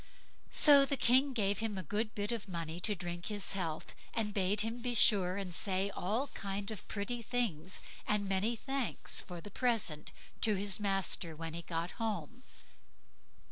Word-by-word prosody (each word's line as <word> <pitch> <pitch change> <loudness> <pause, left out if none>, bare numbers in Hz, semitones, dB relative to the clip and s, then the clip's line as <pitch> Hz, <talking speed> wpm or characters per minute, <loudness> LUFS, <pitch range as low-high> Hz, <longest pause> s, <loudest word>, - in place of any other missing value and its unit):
So 285 -2 +7
the 275 0 +1
King 260 +4 +4
gave 205 -5 0
him 220 -3 -2
a 185 - -4
good 215 +7 -2
bit 205 +1 -1
of 230 -4 -4
money 165 -1 -4
to 210 +3 +1
drink 175 -1 -5
his 205 -2 0
health, 165 -5 -3 0.2
and 210 -2 -1
bade 200 +1 +2
him 225 +2 -3
be 245 0 -1
sure 195 -4 +4
and 190 -3 -4
say 195 +2 0
all 220 +10 -2
kind 200 +1 -4
of 215 - -8
pretty 235 +4 -3
things, 205 -8 -1 0.3
and 210 -1 +1
many 195 +5 +1
thanks 270 +1 -1
for 175 -3 -8
the 205 - -10
present 220 - 0 0.3
to 215 -2 +7
his 200 +1 0
master 195 -5 0
when 165 0 -6
he 170 - -3
got 170 0 -4
home. 225 +3 -3
205 Hz, 175 wpm, -33 LUFS, 185-225 Hz, 0.3 s, So